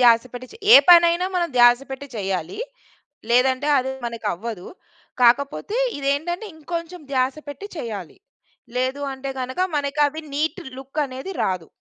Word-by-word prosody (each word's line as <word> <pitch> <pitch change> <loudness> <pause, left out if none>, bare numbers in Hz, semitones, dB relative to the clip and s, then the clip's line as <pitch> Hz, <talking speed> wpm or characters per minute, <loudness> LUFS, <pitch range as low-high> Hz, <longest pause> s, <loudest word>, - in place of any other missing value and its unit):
ధ్యాస 230 -2 +6
పెట్టి 250 +1 -8
చె - - -12 0.2
ఏ - - +13
పనైనా 345 +1 +6
మనం 345 -1 +1
ధ్యాస 240 0 +7
పెట్టి 270 +1 -6
చేయాలి. 190 - -3 0.7
లేదంటే 260 +3 +3
అది 265 0 0 0.2
మనకు 230 -2 -4
అవ్వదు. 200 0 -7 0.6
కాకపోతే 280 - +2 0.2
ఇదేంటంటే 310 +9 -1
ఇంకొంచెం 335 +2 -6
ధ్యాస 260 0 +1
పెట్టి 340 +8 -7
చెయ్యాలి. 210 - -6 0.6
లేదు 260 +3 -1
అంటే 265 +1 -6
గనక 260 +5 -4 0.2
మనకి 285 0 -2
అవి 310 +2 -6
నీట్ 315 +5 -1 0.2
లుక్ 270 +3 -6
అనేది 265 +7 -7
రాదు. 185 -4 -2
265 Hz, 140 wpm, -22 LUFS, 240-315 Hz, 0.7 s, ఏ